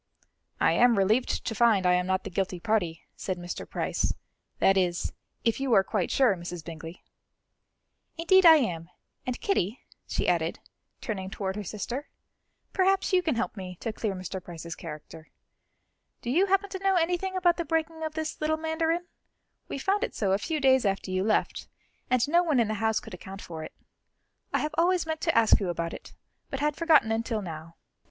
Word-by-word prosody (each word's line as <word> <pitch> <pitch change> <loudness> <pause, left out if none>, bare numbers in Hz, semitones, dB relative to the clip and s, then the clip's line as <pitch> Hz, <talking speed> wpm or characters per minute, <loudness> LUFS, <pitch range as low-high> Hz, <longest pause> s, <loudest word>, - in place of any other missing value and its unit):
"I - - +4
am 240 -2 +4
relieved 215 +6 +1
to 225 - -1
find 220 -4 +3
I 180 - +5
am 180 0 +1
not 190 0 0
the - - -7
guilty 185 -1 -2
party," 175 -5 -1
said 185 -2 -3
Mr. 175 0 -6
Price; - - -1 0.4
"that 195 - +4
is, 180 -2 0 0.3
if 230 +1 +1
you 270 -2 -1
are 195 - +6
quite 195 -3 -1
sure, 255 -7 +3
Mrs. 175 -2 -7
Bingley." 165 +1 -9 1.1
"Indeed 375 +3 +5
I 330 -2 +10
am; 175 - -1 0.4
and 250 - -2
Kitty," 245 - 0 0.3
she - - -1
added, - - +1 0.4
turning 190 -4 -4
toward 190 -1 -3
her 210 - -4
sister, 235 - -5 0.6
"perhaps 385 0 +2
you 365 - +5
can 320 -7 0
help 230 - -2
me 185 -2 -7
to 225 - -3
clear 215 -3 -2
Mr. 185 0 -6
Price's 170 -1 -7
character. 160 0 -10 0.9
Do 240 - -2
you 365 +8 +3
happen 390 +1 +1
to 380 - -4
know 390 -1 +3
anything 360 +2 0
about 355 -2 +3
the 340 - -1
breaking 320 +1 -1
of 310 -1 -4
this 315 -1 -4
little 310 +1 +1
mandarin? 320 +2 -1 0.6
We - - -4
found 395 - 0
it - - -3
so 200 -3 0
a 195 - +2
few 315 +6 -2
days 265 -2 +4
after 195 -2 -1
you 185 0 0
left, 215 +1 0 0.4
and 250 0 +3
no 340 +4 +4
one 310 -7 +2
in 225 -2 +2
the - - 0
house 220 -1 +2
could - - -12
account 190 +2 -9
for 160 -2 -7
it. - - -9 0.8
I - - +2
have 305 0 -2
always 355 0 +3
meant 315 -1 -3
to 330 -6 +1
ask 225 -1 +6
you 195 -4 -2
about 170 -1 -2
it, - - -10 0.3
but 270 - -4
had 295 0 +1
forgotten 315 -9 +4
until 225 -1 -1
now." 165 -1 -8
225 Hz, 195 wpm, -28 LUFS, -, 1.1 s, I